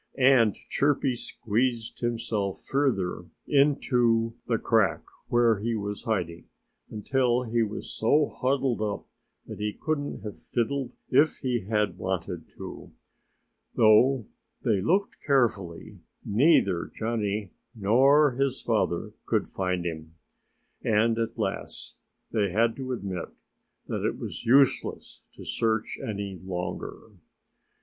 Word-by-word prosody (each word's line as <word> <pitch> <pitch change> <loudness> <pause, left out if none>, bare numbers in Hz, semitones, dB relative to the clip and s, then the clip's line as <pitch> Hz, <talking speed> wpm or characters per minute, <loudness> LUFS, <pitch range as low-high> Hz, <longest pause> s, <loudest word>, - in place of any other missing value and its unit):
And 125 -5 +5
Chirpy 140 -2 0
squeezed 115 0 -2
himself 115 -4 -2
further 100 -11 0 0.2
into 120 -5 +3
the 115 - +2
crack 105 -6 +2 0.2
where 120 -3 +3
he 115 +2 -1
was 105 -1 -4
hiding 90 -7 -2 0.4
until 125 +3 +1
he 120 0 0
was 110 -1 -3
so 145 +7 +3
huddled 130 -2 0
up 105 -2 -2 0.4
that - - -8
he 105 0 -2
couldn't 145 -6 -2
have 105 -2 -7
fiddled 125 +1 -2
if 145 +4 +4
he 120 -6 -1
had 105 -5 0
wanted 95 -2 -3
to. - - -9 0.8
Though 115 +3 +5 0.4
they 100 -4 +2
looked 190 - 0
carefully, 110 - 0 0.3
neither 100 - +3
Johnnie 105 -3 -2 0.2
nor 135 +8 +5
his 135 +1 -1
father 105 -7 -1
could - - +1
find 90 -2 -2
him. 80 -1 -5 0.7
And 115 +1 +2
at 115 +1 -2
last 100 -4 -4 0.3
they 105 -3 +1
had 115 +4 +2
to 130 -1 -4
admit 95 -7 -4 0.6
that - - -3
it - - -1
was - - -7
useless 135 +2 +2
to - - -11
search 110 -1 -1
any 100 -3 -4
longer. 90 -1 -5
115 Hz, 120 wpm, -27 LUFS, 100-130 Hz, 0.8 s, And